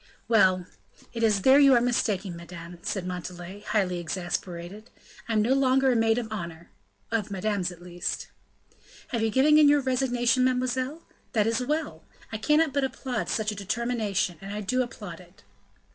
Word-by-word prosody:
"Well! 190 -5 +4 0.5
it 230 - -4
is 210 -4 +2
there 265 +2 +7
you 275 -2 +7
are - - +6
mistaken, 210 -6 0
madame," 170 0 -10
said 190 -1 -3
Montalais, 180 +2 -7
highly 190 -4 0
exasperated; 175 +3 -5 0.4
"I - - 0
am 215 -1 +3
no 245 +4 +3
longer 265 0 +3
a - - +2
maid 225 0 +3
of 240 -2 -2
honor, 170 -4 -7 0.4
of 220 -3 -1
madame's 195 -2 -1
at 175 0 -13
least." 175 0 -4 0.8
"Have 235 -3 -1
you 225 - +2
given 290 +7 +5
in 295 -1 +7
your 290 0 +4
resignation, 255 -2 +1
mademoiselle? 255 +4 -1 0.3
That 215 -4 +3
is 230 +2 +1
well! 295 - -2 0.3
I 220 - -4
cannot 300 +3 +3
but 280 -1 +1
applaud 260 -3 -3
such 215 -1 0
a - - -6
determination, 205 -4 -1
and 195 +1 -7
I 210 +1 -4
do 255 +6 0
applaud 205 -8 -6
it." 180 +1 -18
215 Hz, 175 wpm, -27 LUFS, 185-255 Hz, 0.8 s, there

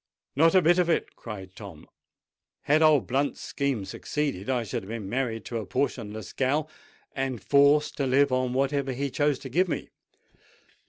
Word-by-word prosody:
"Not 165 +5 +4
a 185 - +6
bit 175 +3 +4
of 175 -1 +2
it!" 165 - 0
cried 95 -5 -8
Frank. 95 -7 -11 0.8
"Had 150 +2 +3
old 155 -3 +5
Blunt's 140 +3 -1
scheme 135 -8 -2
succeeded, 140 -4 -3
I 125 -3 +1
should 115 +2 -4
have 95 - -12
been 110 -3 -5
married 115 -1 -2
to 115 - -4
a 110 - -6
portionless 110 -3 -3
gal, 145 +4 0 0.5
and 135 -3 -2
forced 140 +3 +3
to 140 - 0
live 135 +2 +3
on 130 -1 +1
whatever 135 0 0
he 140 +2 -3
chose 145 0 +1
to 135 - -9
give 180 +9 +2
me. 165 - -4
135 Hz, 175 wpm, -27 LUFS, 115-145 Hz, 0.8 s, a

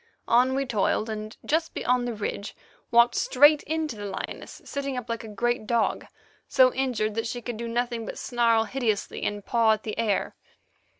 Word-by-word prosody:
On 250 +3 +4
we 275 0 0
toiled, 220 -1 0
and, 215 0 -6
just 320 +2 0
beyond 250 0 +1
the 235 - -3
ridge, 205 0 -4 0.3
walked 235 +1 +5
straight 290 +3 +5
into 315 -4 -2
the 205 -1 -7
lioness, 190 - -6
sitting 275 -2 -3
up 245 -2 -5
like 230 0 -3
a - - -8
great 225 +1 -1
dog, 235 -1 0 0.4
so 255 -1 +5
injured 240 -5 -1
that 225 +1 -2
she 245 - -4
could 240 0 -5
do 235 +1 -4
nothing 235 -1 -2
but - - -6
snarl 230 -2 +2
hideously 225 -4 -2
and 205 -1 -3
paw 230 -2 +3
at 215 - -4
the 215 - -4
air. 215 -3 0
235 Hz, 185 wpm, -26 LUFS, 220-255 Hz, 0.4 s, walked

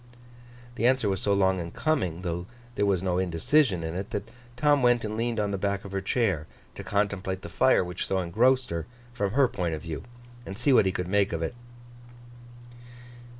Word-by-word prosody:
The 115 - +3
answer 130 -4 +2
was 95 -1 -1
so 100 - +1
long 95 -1 +3
in 85 -1 -4
coming, 95 - -1
though 85 0 -3 0.3
there 105 -3 +1
was 95 -2 +1
no 90 -1 +1
indecision 95 - +2
in 80 0 -3
it, 95 +2 -4
that 100 0 -5 0.3
Tom 145 +1 +3
went 120 -2 +3
and 105 0 -3
leaned 115 0 -1
on 105 -1 0
the 100 - -2
back 100 0 -1
of 100 - -8
her 95 0 -2
chair, 95 -7 0 0.3
to - - -8
contemplate 100 -2 -1
the - - -7
fire 130 -6 +3
which 90 0 -4
so 95 - 0
engrossed 120 +9 +2
her, 85 -1 -3 0.3
from 100 -5 -1
her 135 -1 +5
point 90 -8 -2
of 75 - -8
view, 80 -4 -5 0.4
and 95 -4 -7
see 125 +4 +3
what 110 - +5
he - - +2
could 90 -1 -3
make 100 +1 +2
of 85 -1 -2
it. 80 - -2
100 Hz, 205 wpm, -27 LUFS, 90-115 Hz, 0.4 s, her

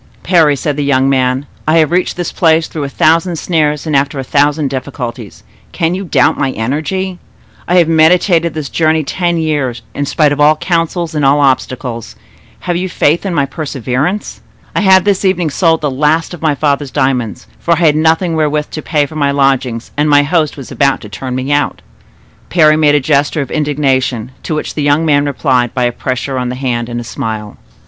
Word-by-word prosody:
"Parry," 165 -5 +3
said 145 +2 -3
the 145 - -1
young 135 -1 +2
man, 130 +1 0 0.2
"I 155 +2 +3
have 160 -1 +3
reached 180 0 0
this 175 - -3
place 160 -1 +2
through 150 -3 -5
a - - -5
thousand 165 +4 +2
snares 150 -3 0
and 155 -2 -1
after 140 +1 +1
a 135 - -3
thousand 145 +1 +1
difficulties; 125 -5 -6 0.3
can 165 0 0
you 190 +2 -4
doubt 170 - +2
my 135 - +1
energy? 165 - -3 0.5
I 175 - +1
have 175 -3 +5
meditated 165 +1 +3
this 150 -4 -4
journey 160 -1 +1
ten 175 +3 -1
years, 145 -7 -2
in 145 0 -3
spite 150 0 +2
of 145 - -2
all 150 +1 +5
counsels 170 0 -1
and 150 -2 -1
all 140 +2 +4
obstacles—have 125 - -3
you 185 +2 -2
faith 170 +4 +1
in 180 - -2
my 140 - +2
perseverance? 140 - -3 0.3
I - - +1
have 190 -2 +5
this 200 -1 +1
evening 180 -5 +1
sold 165 +1 +2
the 145 -2 -1
last 155 +5 0
of 175 - -9
my 155 -3 +1
father's 140 -1 0
diamonds; 125 -5 -1
for 170 - +1
I 170 +1 +1
had 150 -2 +4
nothing 160 +2 +1
wherewith 150 -1 -1
to 155 - -5
pay 150 -1 0
for 155 - -11
my 145 -2 +1
lodgings 135 -4 0
and 150 +1 +1
my 145 0 +5
host 155 -1 0
was 135 - -9
about 140 -1 +1
to 105 - -10
turn 125 +4 -5
me 130 +2 -3
out." 145 0 0 0.7
Parry 155 -3 +4
made 150 -2 +3
a - - +4
gesture 145 +2 +1
of - - -11
indignation, 135 -5 -1
to 155 - -3
which 155 - -4
the 150 - -3
young 145 +3 +2
man 145 -2 +2
replied 130 -3 0
by 125 - 0
a 120 - +1
pressure 130 +2 -3
of 125 -1 -2
the 125 - -4
hand 120 -3 -2
and 120 0 -4
a - - -5
smile. 110 -2 -5
145 Hz, 205 wpm, -13 LUFS, 135-160 Hz, 0.7 s, have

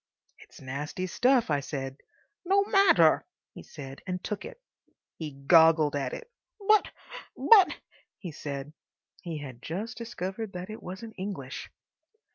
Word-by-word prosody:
"It's - - -16
nasty 145 +7 -4
stuff," 245 - +2
I 145 - +2
said. 135 -1 -5 0.5
"No 390 +2 +3
matter," 390 - +5 0.3
he - - -10
said, 135 -3 -10
and 180 0 -3
took 205 -1 -4
it. - - -10 0.6
He 160 -2 -4 0.2
goggled 160 -2 +6
at 135 -3 -1
it. 475 - -8 0.4
"But—but—" 430 -1 +3 0.4
he 175 - -7
said. 145 0 -6 0.5
He 170 -4 -5
had 130 -5 -8
just 210 - -5
discovered 215 -2 -5
that 180 +3 -6
it 215 - -8
wasn't 200 +5 -8
English. 170 -10 -5
180 Hz, 130 wpm, -28 LUFS, 145-225 Hz, 0.6 s, goggled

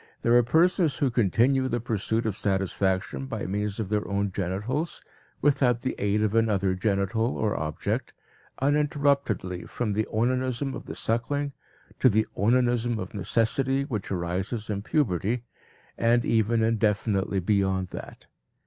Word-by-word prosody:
There 120 - +4
are 120 - +7
persons 160 - +3
who 135 -3 +1
continue 120 +4 +2
the 120 -1 -1
pursuit 110 0 -1
of 110 -3 -1
satisfaction 95 +3 -1
by 110 -5 -4
means 100 +2 -2
of 105 -4 -3
their 105 0 0
own 100 0 -1
genitals, 105 - -2 0.4
without 135 -5 +3
the 130 - -1
aid 105 +1 +1
of 105 -1 0
another 105 -4 +2
genital 100 +4 0
or 110 -2 0
object, 75 0 -2 0.5
uninterruptedly 140 - +1
from 110 -4 -2
the 110 +2 0
onanism 130 +3 0
of - - -7
the - - -6
suckling 140 +5 -1 0.5
to 130 - +6
the 110 0 +2
onanism 120 +2 +2
of 115 - -6
necessity 115 +7 +1
which 115 -8 -4
arises 95 +5 -2
in 100 -1 -2
puberty, 115 - 0 0.6
and 120 +1 +3
even 115 0 +2
indefinitely 105 -3 +1
beyond 95 -1 +1
that. - - -9
110 Hz, 140 wpm, -26 LUFS, 100-125 Hz, 0.6 s, are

